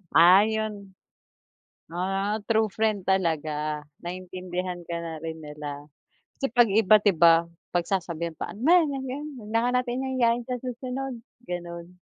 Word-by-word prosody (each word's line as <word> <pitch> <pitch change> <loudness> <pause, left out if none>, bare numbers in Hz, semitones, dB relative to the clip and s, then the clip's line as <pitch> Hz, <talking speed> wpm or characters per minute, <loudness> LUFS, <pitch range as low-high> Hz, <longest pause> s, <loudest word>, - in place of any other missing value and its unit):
Ah, 185 +5 +8
yun. 215 -3 -4 0.9
Ah, 195 +5 -1
true 220 -1 +4
friend 210 -2 -1
talaga 155 -5 0 0.2
naintindihan 180 0 -5
ka 170 0 -4
na 165 -1 -5
rin 160 0 -5
nila. 150 -1 -7 0.5
Kasi 270 - -1
'pag 240 -1 +6
iba 215 0 +6
di 205 -1 +4
ba 165 0 +6 0.3
pagsasabihan 170 -2 -1
pa - - -5
ano 210 - -10 0.4
yan, 270 +3 -5
'wag 210 - -11
na 230 - +3
nga - - 0
natin 250 +1 -3 0.2
yayain 235 0 +3
sa 250 -1 -2
susunod, 255 +1 -4 0.3
ganon. 175 0 -7
185 Hz, 140 wpm, -26 LUFS, 170-220 Hz, 0.9 s, Ah